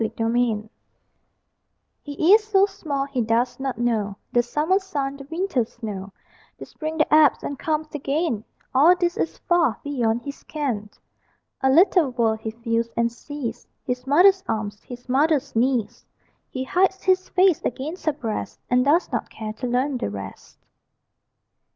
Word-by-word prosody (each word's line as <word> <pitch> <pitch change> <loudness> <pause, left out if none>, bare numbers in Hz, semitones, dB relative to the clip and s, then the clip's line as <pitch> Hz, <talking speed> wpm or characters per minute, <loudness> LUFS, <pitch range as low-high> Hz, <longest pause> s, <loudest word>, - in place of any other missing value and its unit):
SIX 225 0 -2
WEEKS - - -1 0.3
OLD 215 0 -5 1.3
He 310 +5 +3
is 435 0 +6
so 400 -2 +4
small, 295 -8 -3
he 275 -3 -2
does 235 +3 0
not 265 -1 -3
know 220 -4 0 0.2
The 240 - +4
summer 300 +10 +1
sun, 280 -8 -3
the 275 - -10
winter 330 -6 0
snow; 210 -4 -7 0.5
The - - -8
spring 315 0 -6
that 305 -1 +1
ebbs 305 -3 +5
and 280 -1 -5
comes 310 -1 -2
again, 285 -5 -1 0.3
All 305 +7 +6
this 350 -1 0
is - - -2
far 335 -11 +1
beyond 240 -5 -1
his 280 +2 -7
ken. 245 -9 -3 0.7
A 265 - +3
little 335 +1 +5
world 230 -3 0
he 220 - -4
feels 230 0 -2
and 235 0 +2
sees: 245 -2 -7 0.2
His 250 0 -3
mother's 375 +7 +5
arms, 205 -1 -3
his 245 0 -11
mother's 285 +1 +1
knees; 240 -2 0 0.5
He 260 - -4
hides 380 +7 +1
his 370 0 +2
face 370 -2 +3
against 310 +9 -4
her 310 - +3
breast, 230 -7 -5
And 250 0 +4
does 305 +6 +2
not - - -2
care 215 -1 -6
to 250 +3 -5
learn 255 +2 0
the - - -2
rest. 100 -1 -9
270 Hz, 165 wpm, -23 LUFS, 235-315 Hz, 1.3 s, is